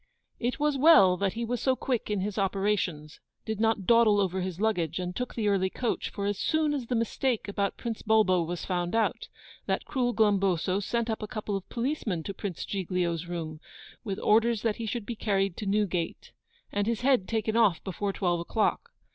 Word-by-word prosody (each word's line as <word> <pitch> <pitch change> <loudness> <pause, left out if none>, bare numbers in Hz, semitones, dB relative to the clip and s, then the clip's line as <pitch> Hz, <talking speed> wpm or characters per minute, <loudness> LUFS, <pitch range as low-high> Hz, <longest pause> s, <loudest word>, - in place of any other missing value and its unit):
It 245 +3 -2
was 295 -2 +1
well 200 - +7
that 195 0 0
he 235 +1 -3
was 240 +1 -2
so 260 -1 +2
quick 250 -4 -2
in 205 -2 0
his 205 +1 -2
operations, 195 -6 -1 0.3
did 220 -2 -3
not 220 -3 +1
dawdle 230 -2 +5
over 190 -1 0
his 180 -1 -4
luggage, 175 -7 0
and 180 -1 -3
took 250 - -4
the 220 -3 0
early 190 -2 +2
coach, 240 +4 -2
for 200 - -4
as 205 0 -1
soon 315 -1 +1
as 265 -5 -3
the 245 - -1
mistake 230 +1 0
about 200 -1 -1
Prince 230 -2 -4
Bulbo 215 -5 +3
was 170 +1 -4
found 175 +1 -1
out, 225 - 0 0.4
that - - -1
cruel 250 -3 0
Glumboso 195 -4 +2
sent 235 +3 -1
up 220 -1 -2
a 215 - -4
couple 210 -1 -4
of 195 - -6
policemen 235 - -2
to 200 - -5
Prince 190 -3 -5
Giglio's 180 -3 -2
room, 160 -3 -5 0.4
with 200 -5 -3
orders 225 +1 +3
that 225 -3 0
he 230 - -4
should 230 -1 -3
be 235 - -4
carried 195 -4 0
to 210 - -4
Newgate, 195 -4 -1 0.4
and 205 0 -1
his 230 -1 -1
head 255 -7 +3
taken 220 -1 -1
off 210 -8 +3
before 195 +2 -2
twelve 175 -3 0
o'clock. 205 +5 0
205 Hz, 200 wpm, -28 LUFS, 185-230 Hz, 0.4 s, well